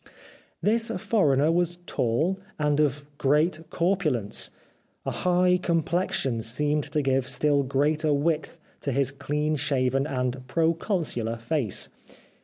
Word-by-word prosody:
" - - -27
This 225 +2 +3
foreigner 150 - +2
was 175 0 +1
tall 155 +12 0 0.2
and 150 -1 +1
of 145 -1 +1
great 150 +4 +2
corpul 170 -6 +1
ence. 105 -2 -1 0.6
A - - -1
high 180 0 +2
complexion 165 -8 0
seemed 145 +6 0
to 150 -1 -1
give 135 -1 +1
still 140 +2 +2
greater 150 +3 +1
width 150 +2 0 0.2
to 140 - -2
his 135 0 +1
clean 150 +2 -1
shaven 135 -2 +1
and 130 -2 -3
proconsular 160 - 0
face. 115 - 0
150 Hz, 125 wpm, -26 LUFS, 135-165 Hz, 0.6 s, This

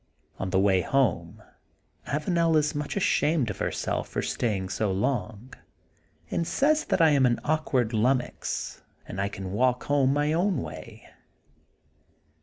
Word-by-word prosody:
On 95 - -2
the 95 - +1
way 95 -2 +3
home 90 -10 0 0.6
Avanel 165 +2 +1
is 150 +1 +1
much 145 +4 -3
ashamed 155 - +1
of - - -9
herself - - -2
for - - -3
staying 100 -6 -2
so 100 +1 -1
long 110 +3 -2 0.8
and 170 - -1
says 310 +3 +2
that - - +1
I 160 -1 +6
am 135 -3 +4
an 120 - +1
awkward 135 -7 0
lummox, 125 +4 -1 0.3
and 95 - -4
I 100 - -1
can 95 -2 -7
walk 125 +4 +1
home 140 -2 +2
my 145 +2 +1
own 180 +3 +1
way. 80 0 -10
130 Hz, 145 wpm, -27 LUFS, 100-150 Hz, 0.8 s, I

